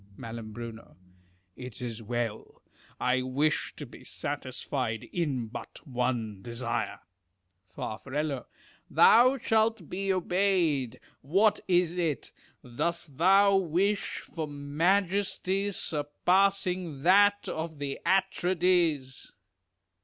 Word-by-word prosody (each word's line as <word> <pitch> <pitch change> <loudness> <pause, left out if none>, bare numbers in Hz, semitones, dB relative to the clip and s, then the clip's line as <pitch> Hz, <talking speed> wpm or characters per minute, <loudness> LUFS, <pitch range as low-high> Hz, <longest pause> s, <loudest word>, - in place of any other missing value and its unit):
Mai. 115 - -7 1.2
It 125 -4 -9
is 115 -2 -5
well. 115 -1 -4 0.4
I 125 +1 +2
wish 140 +4 0
to 145 - -7
be 125 - -14
satisfied 130 -5 -3
in 145 -9 -1
but 110 - -9
one 120 -6 -2
desire. 115 +1 -3 0.7
Far. 95 +2 -6 0.9
Thou 255 +4 +6
shalt 220 - +1
be 195 +1 -2
obeyed. 175 - +1 0.2
What 200 +9 +3
is 180 -1 +2
it? 155 -8 -1 0.3
Dost 145 +4 -3
thou 195 +3 +6
wish 195 +3 0
for 160 -2 -5
majesty 185 +6 0
surpassing 180 0 0
that 205 +3 +5
of 160 -1 -4
the 140 -1 -4
Atrides? 175 -7 +1
160 Hz, 95 wpm, -29 LUFS, 130-190 Hz, 1.2 s, Thou